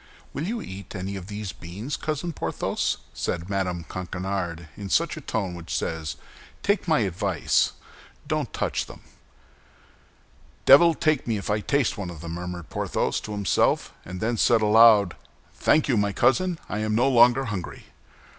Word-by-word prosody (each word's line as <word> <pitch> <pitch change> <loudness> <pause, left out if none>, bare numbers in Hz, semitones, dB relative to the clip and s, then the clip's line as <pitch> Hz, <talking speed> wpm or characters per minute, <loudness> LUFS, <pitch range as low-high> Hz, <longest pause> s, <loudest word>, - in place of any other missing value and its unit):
"Will 155 +5 -3
you 230 +1 -3
eat 95 +1 -9
any 95 +1 -4
of 95 -2 -7
these 105 -2 -5
beans, 100 +11 -6
Cousin 155 +2 -3
Porthos?" - - -1 0.2
said 90 +3 -3
Mme. 90 -3 -1
Coquenard, 90 -1 -4
in 100 -2 -6
that 160 - 0
tone 100 -6 -1
which 85 -1 -4
says, 80 -2 -3 0.5
"Take 200 -2 +1
my 155 -7 +3
advice, 95 -2 +1 0.5
don't - - -1
touch - - -2
them." - - -12 1.6
"Devil 165 +5 +8
take 155 -5 +1
me 115 -2 0
if 100 - -3
I 105 - +1
taste 135 -1 0
one 95 -3 -4
of 85 -3 -9
them!" 85 -1 -6
murmured 90 -1 -6
Porthos - - -1
to 105 - -8
himself, 100 -3 +1
and 90 +1 -7
then 115 +3 -1
said 115 0 +4
aloud, 105 -3 +6 0.4
"Thank 155 - +2
you, 125 -5 +2
my 100 -1 +1
cousin, 180 - +2
I 105 - -3
am 110 0 0
no 120 +4 +3
longer 125 +1 +5
hungry." 100 -7 -5
105 Hz, 160 wpm, -25 LUFS, 90-130 Hz, 1.6 s, Devil